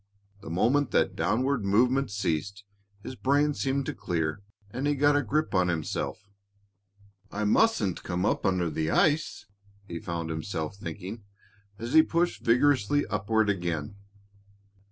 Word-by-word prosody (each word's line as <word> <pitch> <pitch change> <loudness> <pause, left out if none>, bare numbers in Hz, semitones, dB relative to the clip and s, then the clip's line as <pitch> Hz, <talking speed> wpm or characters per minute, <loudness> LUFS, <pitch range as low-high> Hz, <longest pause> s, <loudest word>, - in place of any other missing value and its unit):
The 100 - -9
moment 120 - +2
that - - +2
downward 115 +8 0
movement 125 +6 +2
ceased, 100 0 -2 0.4
his - - -6
brain 145 +3 +2
seemed 135 0 -1
to - - -3
clear 80 +1 -2 0.3
and 135 +6 -2
he 145 - +2
got 145 +1 +3
a 145 - +3
grip 155 +5 -1
on 90 -1 +3
himself. 85 +4 -3 1.0
"I 105 - -3
mustn't 105 - +2
come 90 +2 -2
up - - 0
under 90 -3 +1
the 80 +1 -1
ice," 155 - +1 0.4
he 85 -3 -5
found 85 -1 -4
himself 80 +1 -4
thinking, 100 +4 -7 0.5
as 115 +5 -5
he 160 - +9
pushed 170 +2 0
vigorously 130 +2 +3
upward 110 +2 +1
again. 85 -4 -2
105 Hz, 140 wpm, -27 LUFS, 90-140 Hz, 1.0 s, he